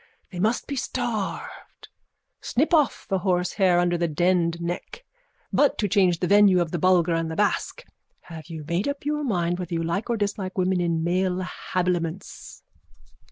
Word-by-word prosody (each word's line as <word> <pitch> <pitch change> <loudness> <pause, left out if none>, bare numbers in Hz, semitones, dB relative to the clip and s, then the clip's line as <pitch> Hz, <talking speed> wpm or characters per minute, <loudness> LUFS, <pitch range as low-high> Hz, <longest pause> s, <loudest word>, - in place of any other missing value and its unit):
They 180 - -7
must 220 +6 +1
be 280 - -4
starved. 240 -5 -4 0.5
Snip 295 +8 0
off 300 -6 +2
with 190 -2 -1
horsehair 180 0 +2
under 175 -1 +1
the 170 - +1
denned 170 +1 +1
neck. 175 - -5 0.5
But, 290 - +3
to 210 - 0
change 185 -3 +3
the - - +2
venue 200 -1 +6
to 175 - +3
the 170 +1 -4
Bulgar 180 -1 +3
and 165 0 -1
the 160 - -4
Basque, 210 - -1 0.4
have 160 -1 -11
you 160 -3 -8
made 175 +6 -1
up 285 0 -4
your 300 0 -1
mind 175 -7 -1
whether 175 -1 -4
you 165 - -1
like 185 +8 -2
or 235 - +1
dislike 200 -2 -3
women 185 0 +1
in 165 -2 0
male 185 +1 0 0.3
habiliments? 175 -1 -3
180 Hz, 170 wpm, -24 LUFS, 170-205 Hz, 0.5 s, venue